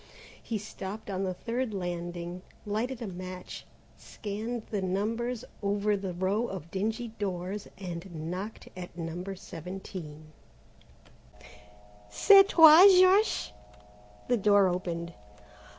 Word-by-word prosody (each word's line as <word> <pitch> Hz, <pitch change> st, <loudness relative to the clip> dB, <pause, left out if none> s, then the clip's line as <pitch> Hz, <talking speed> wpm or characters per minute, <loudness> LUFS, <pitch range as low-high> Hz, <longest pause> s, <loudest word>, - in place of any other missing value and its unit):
He 225 Hz, -, -3 dB
stopped 205 Hz, 0 st, -7 dB
on 190 Hz, 0 st, -2 dB
the 185 Hz, -, -2 dB
third 235 Hz, +1 st, -3 dB
landing, 175 Hz, -1 st, -5 dB, 0.2 s
lighted 230 Hz, +4 st, -2 dB
a -, -, -4 dB
match, 185 Hz, 0 st, -8 dB, 0.3 s
scanned 220 Hz, +3 st, -5 dB
the 205 Hz, -3 st, -1 dB
numbers 225 Hz, +6 st, -2 dB, 0.2 s
over 205 Hz, +1 st, +1 dB
the 195 Hz, -2 st, -4 dB
row 195 Hz, +6 st, 0 dB
of 175 Hz, -6 st, -7 dB
dingy 220 Hz, +5 st, -2 dB
doors, 190 Hz, 0 st, -3 dB
and 170 Hz, -3 st, -6 dB
knocked 195 Hz, +5 st, -6 dB
at 180 Hz, -1 st, -9 dB
No. 165 Hz, +1 st, -5 dB
17. 170 Hz, -4 st, -9 dB, 1.8 s
"C'est 390 Hz, -, +7 dB
toi 325 Hz, +2 st, +9 dB
Georges?" 375 Hz, -, +4 dB, 0.8 s
The 245 Hz, -, +2 dB
door 205 Hz, -2 st, +4 dB
opened. 170 Hz, -1 st, -3 dB
195 Hz, 110 wpm, -29 LUFS, 180-220 Hz, 1.8 s, toi